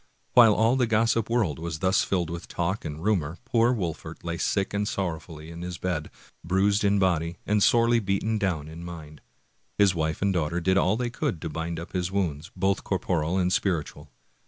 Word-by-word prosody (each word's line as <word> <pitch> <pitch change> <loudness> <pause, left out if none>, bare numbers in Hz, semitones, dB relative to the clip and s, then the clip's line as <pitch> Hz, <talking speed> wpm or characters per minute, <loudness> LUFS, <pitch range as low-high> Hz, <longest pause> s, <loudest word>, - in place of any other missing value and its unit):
While 115 -4 +7
all 115 +4 +3
the 125 -2 +2
gossip 115 0 +2
world 105 - +1
was 85 -1 -4
thus 95 +3 +2
filled 85 -4 -1
with 85 0 -6
talk 85 +3 -2
and 75 +1 -6
rumor, 90 -6 0
poor 115 +1 +3
Wolfert 90 -10 -4
lay 85 -1 -3
sick 100 -1 0
and 100 0 0
sorrowfully 80 -4 -4
in 85 +1 -8
his 90 0 -5
bed, 85 -5 -3 0.3
bruised 100 +4 +2
in 100 0 +3
body 85 -3 +1
and 105 0 +2
sorely 115 +2 +4
beaten 105 +2 -1
down 85 -8 -1
in 80 +2 -9
mind. 80 -4 -9 0.6
His 100 -2 +5
wife 80 0 -2
and 100 -1 +2
daughter 85 0 0
did 95 +2 +2
all 95 +2 +3
they 120 -1 -2
could 120 - -2
to 80 - -3
bind 80 +2 -4
up 85 - -9
his 90 -1 -1
wounds, 85 -5 -2
both 95 +1 0
corporal 90 -2 -1
and 90 -1 +1
spiritual. 85 -8 -2
90 Hz, 195 wpm, -26 LUFS, 85-100 Hz, 0.6 s, While